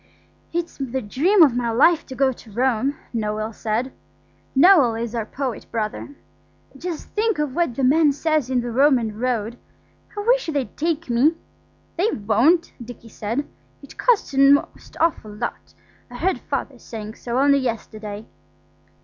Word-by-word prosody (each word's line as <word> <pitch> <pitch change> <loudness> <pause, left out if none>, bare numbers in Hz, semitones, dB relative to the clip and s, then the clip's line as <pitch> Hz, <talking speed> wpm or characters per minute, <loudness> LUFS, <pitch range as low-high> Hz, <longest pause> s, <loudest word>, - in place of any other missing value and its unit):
"It's 340 0 -3
the 265 -1 -3
dream 310 - +3
of 270 -6 +4
my 240 -1 0
life 305 +8 +3
to 260 - -8
go 270 0 +2
to 235 -3 -13
Rome," 255 +4 0 0.2
Noël 215 0 -2
said. 230 +5 -2 0.6
Noël 275 -9 +6
is 235 0 -4
our 225 -2 -3
poet 260 -3 -4
brother. 225 +5 -4 0.6
"Just 330 +3 -6
think 435 -2 0
of 300 -3 -2
what 335 -6 0
the 270 - -2
man 295 +3 +4
says 300 -2 0
in 255 -2 +1
the 240 0 -4
'Roman 240 -4 +2
Road'. 240 -2 -2 0.6
I - - -1
wish - - +2
they'd 285 -5 -2
take 330 +1 -1
me." 255 +7 +3 0.6
"They 385 +6 +2
won't," 245 - +2
Dicky 235 -1 -11
said. 230 +7 -3 0.4
"It - - -13
costs 475 - +2
a 270 - 0
most 275 +1 +3
awful 315 -10 0
lot. 235 +3 -6 0.3
I 245 - -11
heard 370 +8 0
Father - - -4
saying 215 -2 -8
so 235 +1 -4
only 280 +1 +4
yesterday." 215 -4 -5
260 Hz, 160 wpm, -22 LUFS, 230-310 Hz, 0.6 s, Noël